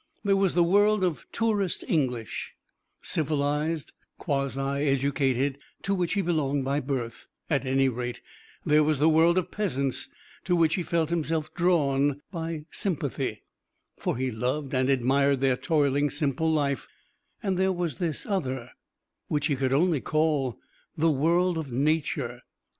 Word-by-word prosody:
There 200 -2 +3
was 195 -3 +1
the 175 - +5
world 205 +3 +4
of 175 -4 -1
tourist 210 -5 0
English, 125 -8 -1 0.5
civilised, 150 +1 -1 0.3
quasi 140 -4 -1 0.3
educated, 135 0 +1 0.2
to 200 - 0
which 180 -3 0
he 200 -1 +1
belonged 145 -5 0
by 140 +2 +1
birth, 125 -4 -4 0.2
at 140 -3 +1
any 135 +1 +3
rate; 120 -1 -3 0.5
there 150 -1 +5
was 150 0 +2
the 150 +3 +3
world 165 +2 +5
of 185 - 0
peasants 140 -11 -1 0.4
to 180 - +2
which 165 -2 +3
he 185 - 0
felt 165 -1 0
himself 160 -2 -1
drawn 145 -5 +2
by 165 -3 -4
sympathy 140 - -2 0.5
for - - -2
he 130 0 -1
loved 130 +5 -2
and 130 0 +2
admired 135 +1 +3
their 135 -1 +3
toiling, 145 -1 +1
simple 150 +2 0
life; 140 -3 0 0.6
and 195 -2 0
there 190 +1 +2
was 175 -7 -3
this 165 -4 -2
other 130 - -2 0.6
which 150 -1 0
he 145 -3 +1
could 130 -1 0
only 155 +1 +2
call 155 -5 0 0.4
the 160 +1 +3
world 170 +4 +2
of 145 -5 -6
Nature. 140 -2 0
150 Hz, 145 wpm, -27 LUFS, 135-170 Hz, 0.6 s, the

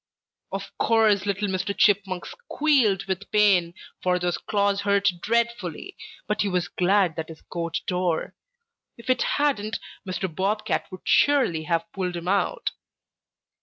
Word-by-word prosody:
"Of 195 0 -6
course 215 -3 +3
little 200 +1 0
Mr. 190 +1 -2
Chipmunk 195 -3 +2
squealed 285 - +1
with 190 +1 -4
pain, 190 -5 +3 0.3
for 180 -1 +2
those 175 0 -1
claws 200 -1 0
hurt 200 0 +3
dreadfully, 235 -7 -1 0.3
but 210 +1 -1
he 205 - +1
was 180 -2 -1
glad 185 -2 +2
that 160 0 -4
his 160 - -11
coat 170 -1 -3
tore. 180 -3 -1 0.6
If 235 +2 -1
it 255 - +1
hadn't, 230 -7 0 0.3
Mr. 185 -1 -3
Bob 205 +5 -1
Cat - - -1
would 185 - -9
surely 250 - +3
have 165 -1 0
pulled 180 -2 -2
him 170 0 -6
out. 200 +1 0
195 Hz, 145 wpm, -25 LUFS, 180-210 Hz, 0.6 s, course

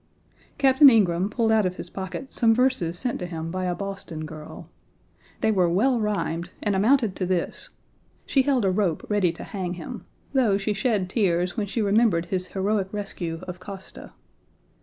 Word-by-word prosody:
Captain 275 +1 +7
Ingraham 190 -5 +3
pulled 225 0 +1
out 215 -3 +4
of 180 - -4
his - - -8
pocket 190 +6 -6
some 225 -2 +3
verses 245 -10 +1
sent 245 +4 -2
to 180 - -4
him 165 -1 -5
by 185 +1 -2
a 180 -1 -1
Boston 195 -5 -5
girl. 155 0 -10 0.7
They 220 - +3
were 185 -4 +3
well 235 +8 +2
rhymed 180 -5 -2
and 205 -2 +1
amounted 225 0 +3
to 185 - -1
this: 180 -2 -2 0.6
she 270 - +3
held 260 -5 +1
a 190 - +3
rope 185 -4 0
ready 200 -5 +3
to - - -9
hang 185 -3 -4
him, 225 +7 -8 0.3
though 235 -7 +3
she 205 +1 -1
shed 210 -3 0
tears 180 -3 +1
when 210 -3 -2
she 215 +3 -1
remembered 200 -4 +3
his 185 0 -2
heroic 195 0 -1
rescue 180 -5 -4
of 180 0 -6
Koszta. 190 +1 -10
195 Hz, 180 wpm, -25 LUFS, 180-225 Hz, 0.7 s, Captain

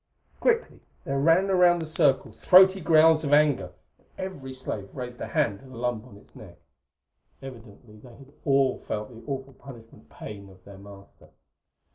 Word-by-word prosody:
Quickly 465 -1 0 0.2
there 140 -4 -3
ran 165 +7 +3
around 180 -2 +4
the 165 - -5
circle 150 -7 +1
throaty 190 - +5
growls 160 0 +4
of 145 -1 -1
anger, 145 -12 +2 0.3
and - - -33
every 185 -9 -7
slave 110 -6 -6
raised 125 -2 -8
a - - -4
hand 100 -3 -1
to - - -18
the 130 - -13
lump 120 -1 -3
on 100 -5 -15
its - - -21
neck. - - -14 0.8
Evidently 115 -4 -13
they 120 +2 -16
had 140 +1 -18
all 135 -2 +1
felt 105 0 -4
the 115 -1 -14
awful 135 0 -6
punishment 120 -5 -15
pain 100 -2 -11
of 95 -1 -19
their 100 -1 -13
master. 100 0 -16
130 Hz, 170 wpm, -25 LUFS, 110-155 Hz, 0.8 s, throaty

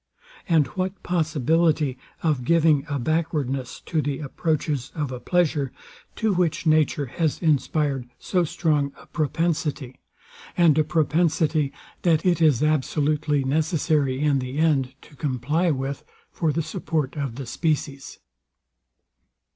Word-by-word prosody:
And 160 -4 +4
what 185 +5 -4
possibility 160 -3 +1 0.3
of 150 -6 +1
giving 155 0 +3
a 145 - -1
backwardness 140 -3 -2
to 160 -3 -1
the 140 -1 -2
approaches 150 -2 -2
of 150 -4 -2
a 125 - -5
pleasure, 150 -3 +1 0.4
to 220 -3 +1
which 175 -2 0
nature 155 -2 +3
has 155 +4 -1
inspired 145 -4 0
so 180 -1 0
strong 150 -3 0
a - - -15
propensity; 150 -4 -2 0.6
and 170 -4 +5
a - - +5
propensity 155 -1 +1 0.3
that 165 -2 +2
it 175 -2 +2
is 150 -4 +4
absolutely 150 -1 +1
necessary 145 -2 +1
in 145 -2 +2
the 130 +2 -5
end 140 -5 +2
to 150 - -17
comply 150 +5 0
with, 135 -1 -2 0.3
for 160 -2 0
the 160 +2 -1
support 155 -2 -2
of 140 -6 -3
the 135 +1 -6
species? 140 +1 -2
150 Hz, 130 wpm, -24 LUFS, 140-160 Hz, 0.6 s, and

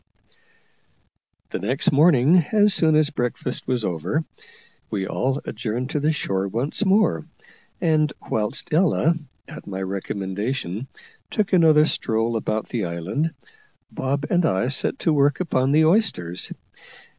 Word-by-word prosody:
The - - -3
next 125 +9 +1
morning, 150 +1 +5
as 210 -1 +4
soon 160 -3 +3
as 155 0 +3
breakfast 125 -1 -3
was 125 -4 0
over, 90 - -2 0.6
we 95 -2 -2
all 135 +7 -1
adjourned 120 +4 -4
to 150 - 0
the 150 +2 +2
shore 95 -10 -2
once 120 - -1
more; 190 - +2 0.5
and 155 -2 +2 0.2
whilst 105 +6 -2
Ella, 165 -1 +3 0.3
at - - -11
my 95 -1 -4
recommendation, 100 +4 -4 0.4
took 210 -3 -1
another 155 -4 +6
stroll 115 -5 -1
about 110 -1 -2
the 115 -6 -2
island, 90 - -3 0.6
Bob 140 +2 -2
and 175 0 +3
I 115 -2 +1
set 140 - 0
to 165 - +1
work 145 0 +2
upon 135 -7 +1
the 155 +2 +4
oysters. 155 - 0
135 Hz, 135 wpm, -23 LUFS, 105-155 Hz, 0.6 s, another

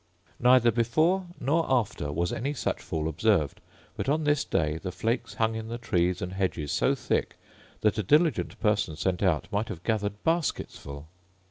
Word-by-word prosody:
Neither 125 -1 +5
before 155 - +2
nor 160 +5 +2
after 105 - 0
was 85 +4 -1
any 140 +5 -2
such - - -2
fall 80 -1 -3
observed; 80 -2 +1 0.3
but - - -2
on 155 +2 +1
this 150 -1 +2
day 75 0 0
the 90 - -5
flakes 115 +6 -2
hung 110 0 +1
in 110 0 -5
the 115 +1 -4
trees 90 -6 0
and 90 +1 -4
hedges 90 -6 -2
so - - +2
thick, - - -1 0.5
that 105 0 +2
a - - +3
diligent 150 - +2
person 105 -7 +1
sent 90 +2 -1
out 90 -7 +1
might 105 +2 -1
have 85 - -7
gathered 105 -2 -1
baskets 165 0 0
full. 70 +1 -9
105 Hz, 175 wpm, -28 LUFS, 85-125 Hz, 0.5 s, Neither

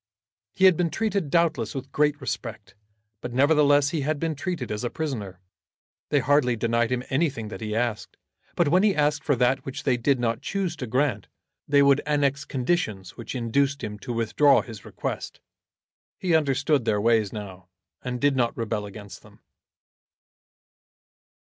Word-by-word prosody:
He 190 - +4
had 185 -2 +7
been 170 0 0
treated 200 -5 -1
doubtless 160 -9 +1
with 135 0 -6
great 150 0 +1
respect, 110 -9 -6 0.5
but 120 - -6
nevertheless 145 +1 +4
he 160 - -1
had 150 +1 -1
been 165 0 -1
treated 150 - -4
as 105 +1 -3
a 120 - -1
prisoner. 115 - -5 0.7
They 145 - +2
hardly 130 -2 +3
denied 115 +1 0
him 125 0 -1
anything 135 -6 0
that - - -8
he 105 -1 -3
asked, 115 -2 -2 0.4
but 175 - +2
when 180 +4 +4
he 205 -2 +3
asked 150 0 +1
for 145 - +2
that 125 +2 +1
which 135 - -6
they 130 -3 +2
did 130 +2 +1
not 115 -1 -1
choose 190 -4 -2
to 125 - -5
grant 125 -3 0 0.4
they 140 0 +5
would 140 0 +4
annex 140 -1 +1
conditions 125 - -2
which 115 - -7
induced 140 +4 0
him 105 -1 -5
to 120 - -6
withdraw 120 +5 +3
his 110 -4 -11
request. - - -5 0.8
He 180 -3 -1
understood 140 -3 +2
their 105 -2 +1
ways 110 -2 +2
now, 95 -4 -8 0.4
and 125 -1 -3
did 145 0 +2
not 120 -2 0
rebel 110 -2 -2
against 100 -2 -11
them. - - -19
130 Hz, 170 wpm, -25 LUFS, 115-150 Hz, 0.8 s, had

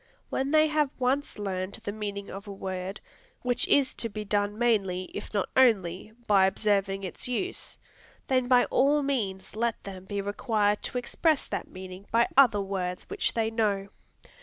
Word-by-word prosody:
When 270 +1 0
they 310 +1 +5
have 300 -2 +1
once 265 +3 0
learned 190 -2 -3
the 205 - -3
meaning 205 -1 -5
of 200 +2 -8
a - - -6
word, 190 0 -5 0.4
which 245 -1 +2
is 275 -2 +3
to 230 - -3
be 210 0 -6
done 205 0 0
mainly, 200 -6 +1
if 205 - -6
not 200 -2 0
only, 210 -7 +3
by 195 -2 +5
observing 195 -1 0
its 185 - -5
use, 365 +10 -3 0.5
then 255 -2 +1
by 250 -1 +5
all 290 +2 +3
means 210 -10 -2
let 235 +1 -1
them 190 -2 -8
be 200 +1 -3
required 205 +1 0
to - - -3
express 295 +5 +1
that - - -4
meaning 185 +1 -9
by 235 +1 +3
other 240 -7 +6
words 185 -2 -3
which 410 - -1
they 225 -1 +1
know. 205 -3 0
210 Hz, 170 wpm, -28 LUFS, 195-250 Hz, 0.5 s, other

